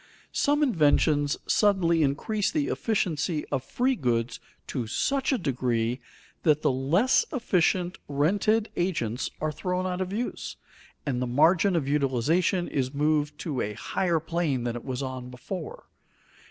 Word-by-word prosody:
Some 290 +1 +2
inventions 150 - +3
suddenly 185 -6 +3
increase 190 +9 0
the 300 -2 -1
efficiency 175 -7 -1
of 135 -3 -1
free 255 - 0
goods 120 - -1 0.3
to 120 -4 -3
such 275 - 0
a 265 - +2
degree 125 - -1 0.4
that 155 -2 +3
the - - +4
less 160 - +3
efficient 185 - +1
rented 200 +10 +1
agents 130 - -1
are 155 0 -1
thrown 180 +4 -2
out 185 0 -2
of 185 0 -3
use, 230 +5 -4 0.5
and 130 -4 -1
the 125 - -1
margin 165 +9 +4
of 150 -5 0
utilization 150 +6 +1
is 130 0 -2
moved 150 0 +1
to 145 -7 -2
a 105 - -2
higher 170 - 0
plane 160 -5 -1
than 120 -1 -2
it 120 - -6
was 130 0 -3
on 130 -1 -5
before. 155 +7 -7
155 Hz, 145 wpm, -27 LUFS, 130-185 Hz, 0.5 s, the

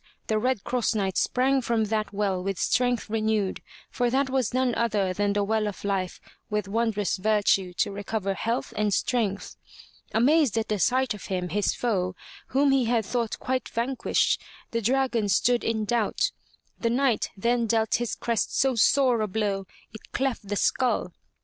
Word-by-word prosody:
the 215 -1 0
Red 250 -2 0
Cross 240 -2 0
Knight 195 -3 -1
sprang 265 +1 +2
from 230 -2 +1
that 215 0 -1
well 200 -2 -1
with 195 0 -3
strength 245 +4 +1
renewed, 215 -3 0 0.3
for 245 -1 0
that 265 +1 +1
was 260 -4 +1
none 255 -1 +1
other 210 -5 0
than 205 +1 0
the 205 0 +1
well 215 +1 0
of 205 - -6
life 195 -3 -2 0.3
with 210 -2 -1
wondrous 210 -2 0
virtue 200 -2 +2
to 175 - 0
recover 200 0 -2
health 230 +5 -2
and 210 -1 +1
strength. 220 -6 -1 0.5
Amazed 265 +1 +3
at 215 -3 -1
sight 255 +4 +2
of 210 - -9
him, 180 -2 -2
his 205 +2 0
foe, 185 -6 -1 0.3
whom 275 +1 +3
he 270 -2 +3
had 230 -2 +1
thought 235 0 -2
quite 255 -1 -2
vanquished, 245 +3 0 0.3
the 230 - -1
dragon 240 -2 +1
stood 240 +5 +3
in 220 -1 0
doubt. 225 0 0 0.5
The 230 - 0
Knight 250 -1 +1
then 235 +3 +1
dealt 220 0 +1
his 240 -1 -2
crest 230 -3 -1
so 270 -1 +3
sore 250 0 +3
a 215 - 0
blow 200 -1 -2 0.3
it 220 - -12
cleft 260 -6 -1
the 205 - -2
skull. 220 -5 +1
220 Hz, 170 wpm, -26 LUFS, 205-245 Hz, 0.5 s, Amazed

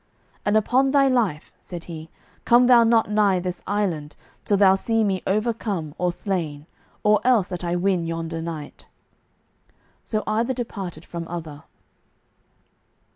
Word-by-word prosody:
"And 205 +1 +3
upon 255 +5 +2
thy 275 0 +4
life," 225 - 0
said 175 -2 -8
he, 160 -1 -9 0.3
"come 240 +1 +5
thou 245 -2 +7
not 225 -2 +3
nigh 205 -3 +3
this 180 0 -4
island 180 -8 -2 0.3
till 205 - +2
thou 190 -1 +6
see 225 +3 +1
me 195 -3 0
overcome 205 -6 -1
or 180 0 +1
slain, 170 -5 -3 0.4
or 210 0 +4
else 240 -7 +3
that 180 -1 -5
I 175 0 -1
win 175 -2 0
yonder 165 0 -4
knight." 160 -3 -7 1.2
So 215 -1 -2
either 230 +4 0
departed 195 -9 -6
from 170 -1 -6
other. 160 -4 -7
190 Hz, 140 wpm, -23 LUFS, 170-220 Hz, 1.2 s, thou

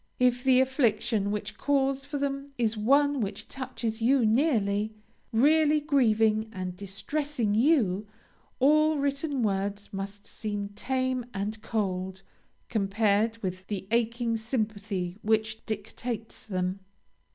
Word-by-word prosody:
If 250 0 +2
the 260 -1 +5
affliction 235 -5 +1
which 210 0 -4
calls 275 -1 +1
for 290 0 -3
them 275 0 -3
is 230 -2 +1
one 280 +5 +3
which 200 -1 -4
touches 245 -4 -4
you 250 +1 +4
nearly, 215 -4 +2 0.4
really 300 +5 +4
grieving 225 -7 +2
and 185 -3 -5
distressing 220 +5 -2
you, 215 - +3 0.5
all 305 +3 +4
written 280 -1 -1
words 200 0 -2
must 200 +1 -6
seem 205 -2 -4
tame 255 +3 -1
and 210 +3 -3
cold, 190 -4 -2 0.4
compared 215 +1 +1
with 185 0 -4
the 195 -2 -4
aching 235 0 +1
sympathy 210 -5 -3
which 220 0 0
dictates 220 +1 -5
them. 185 -1 -1
225 Hz, 120 wpm, -28 LUFS, 205-265 Hz, 0.5 s, the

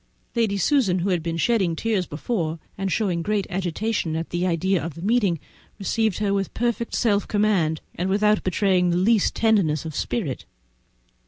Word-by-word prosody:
Lady 220 -4 +1
Susan, 200 - +2
who 185 +2 -1
had 180 -3 +1
been 165 0 -3
shedding 190 -3 +2
tears 210 -2 -1
before, 165 0 -2 0.2
and 195 -1 -2
showing 185 -6 0
great 205 +1 0
agitation 185 -1 -1
at 165 +1 -4
the 175 +1 0
idea 180 0 +1
of 165 -2 -5
the 165 - -9
meeting, 205 -6 +2 0.4
received 220 0 0
her 205 -2 0
with 195 -1 -1
perfect 235 -1 -1
self 205 -4 +1
command, 195 -7 +1
and 180 +2 -2
without 210 +2 +3
betraying 185 -1 +2
the 175 - +1
least 205 +3 +3
tenderness 195 -10 +2
of 160 - -5
spirit. 155 - -2
195 Hz, 170 wpm, -24 LUFS, 170-215 Hz, 0.4 s, without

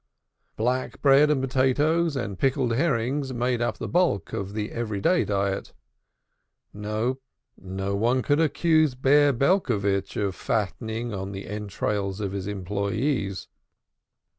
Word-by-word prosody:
Black 125 +3 -1
bread 140 +1 +6
and 140 -3 +1
potatoes 145 +5 +2
and 100 -7 -4
pickled 130 -3 +1
herrings 135 0 0
made 120 0 0
up 120 - -1
the - - -5
bulk 170 - +1
of 100 0 -4
the 105 0 -3
every 110 -4 -3
day 180 - +3
diet 100 -1 -2 1.0
No, 110 +5 -2 0.4
no 95 +2 -4
one 120 +5 +1
could 145 +1 +2
accuse 155 -3 +3
Bear 140 +3 +4
Belcovitch 115 - +1
of 100 -2 0
fattening 110 +3 -2
on 95 0 -4
the 95 0 -6
entrails 100 -1 -3
of 100 -2 -2
his 100 -1 -4
employees. 100 +2 -2
115 Hz, 130 wpm, -25 LUFS, 100-135 Hz, 1.0 s, bread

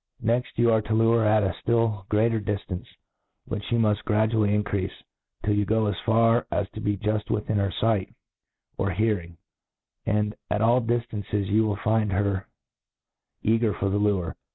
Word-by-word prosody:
Mf - - -11
Next 120 +3 0
you 120 0 +4
arc 110 -1 +2
ta 110 - 0
lure 115 +1 +4
ber 110 - +2
at 105 0 +4
a 95 - 0 0.2
{)iU 115 -4 +1
greater 110 +2 +2
di 105 0 -2
ftance^ 95 -3 -7 0.6
which 105 0 -5
you 120 - +3
mufi 105 -2 +1
gradually 110 -1 +2
mcceafe, 100 -2 -1 0.5
till 105 - +1
you 105 0 +2
go 110 +2 +1
as 105 -2 -1
far 115 +1 +3
as 100 - -1
to 110 - -8
be 105 -1 0
juft 105 +2 -1
witUn 105 0 -1
her 100 -1 +1
fight 110 -4 +1 0.7
or 100 - +1
hearing 90 -3 -1 0.4
} - - -62
and 105 -1 +1 0.2
at 105 +1 0
all 120 +3 +4
diftances 115 -4 -2
you 105 +3 +2
wiU 105 -2 -1
find 110 -2 +1
her 100 0 0 1.0
caggr 115 -1 +2
for 100 - 0
the 100 +1 0
lure. 100 -5 0
105 Hz, 185 wpm, -25 LUFS, 100-115 Hz, 1.0 s, you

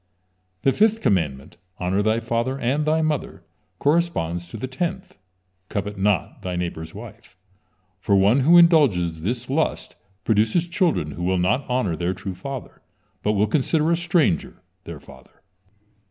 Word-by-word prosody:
The 135 - +3
fifth 220 +1 +3
commandment: 80 - -1 0.2
"Honor 95 +3 0
thy 110 +2 +1
father 115 +3 -2
and 140 +4 -1
thy 160 +1 +2
mother," 155 -3 -3 0.3
corresponds 140 - 0
to 110 - -7
the 110 - -4
tenth: 175 +9 -4 0.5
"Covet 100 0 -3
not 100 -2 0
thy 90 -1 -4
neighbor's 85 -2 -5
wife," 110 -2 -12 0.6
for 100 +1 +1
one 100 +7 +4
who 165 +6 +6
indulges 120 - +4
this 120 +7 -3
lust 150 +4 -1 0.3
produces 110 +10 +2
children 165 - 0
who 85 - -6
will 95 +1 +1
not 105 +11 0
honor 125 -9 0
their 90 +3 -2
true 95 +1 -6
father, 130 +8 -8 0.4
but 105 - +1
will 105 0 +2
consider 150 +7 +1
a - - +4
stranger 170 - 0 0.2
their - - -8
father. 65 -1 -18
115 Hz, 150 wpm, -23 LUFS, 90-150 Hz, 0.6 s, who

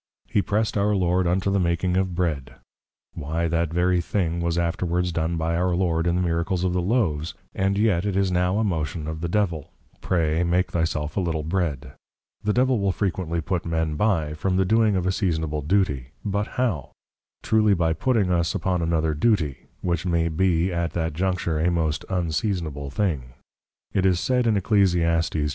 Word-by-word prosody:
He 100 - +1
press'd 105 +1 0
our 105 +1 +2
Lord 90 -1 +1
unto 95 +3 +1
the 100 - +2
making 90 +1 0
of 95 -1 0
Bread; 75 -8 -2 0.6
Why, 80 +4 -2
that 85 -1 0
very 90 +1 +2
thing 85 -2 -1
was 85 0 0
afterwards 85 +1 0
done 80 0 -1
by 80 +1 -1
our 90 +1 +1
Lord, 85 -2 +1
in 85 - +2
the 90 - +1
Miracles 85 +1 -1
of 90 -1 +1
the 90 - +1
Loaves; 85 -7 0 0.2
and 95 +1 0
yet 100 -5 +2
it 100 -2 -1
is 95 -1 +2
now 90 +2 +1
a 110 - +2
motion 80 -5 -2
of 80 0 -5
the 85 - -1
Devil, 85 -6 -1 0.3
Pray, 80 -1 +1
make 90 +2 +1
thy 80 -1 +1
self 75 -1 -3
a - - +4
Little 80 -4 -1
Bread. 75 -6 -2 0.5
The 105 - +1
Devil 125 +1 +2
will 100 -1 +1
frequently 90 -4 -2
put 90 +2 -2
men 80 -2 -1
by, 80 -4 +1
from 90 +4 -1
the 95 - +3
doing 110 +1 +3
of 90 -1 0
a 95 - +2
seasonable 80 -6 -1
Duty; 75 -6 0 0.2
but 105 +1 -1
how? 115 - -1 0.5
Truly 110 -2 +3
by 80 -2 +1
putting 105 +1 +1
us 85 -1 +1
upon 90 -2 0
another 80 -1 +1
Duty, 80 - 0
which 85 -3 -1
may 85 -1 +1
be 90 +1 +1
at 85 -2 -1
that 80 -2 -1
juncture 90 -2 -1
a 85 +3 +2
most 80 -3 -1
Unseasonable 85 -5 -2
Thing. 70 -6 -2 0.6
It 95 -1 +2
is 90 -2 +2
said 125 +7 +1
in 110 - +3
_Eccl. 85 -5 +2
8. 75 - 0
85 Hz, 190 wpm, -24 LUFS, 80-95 Hz, 0.6 s, a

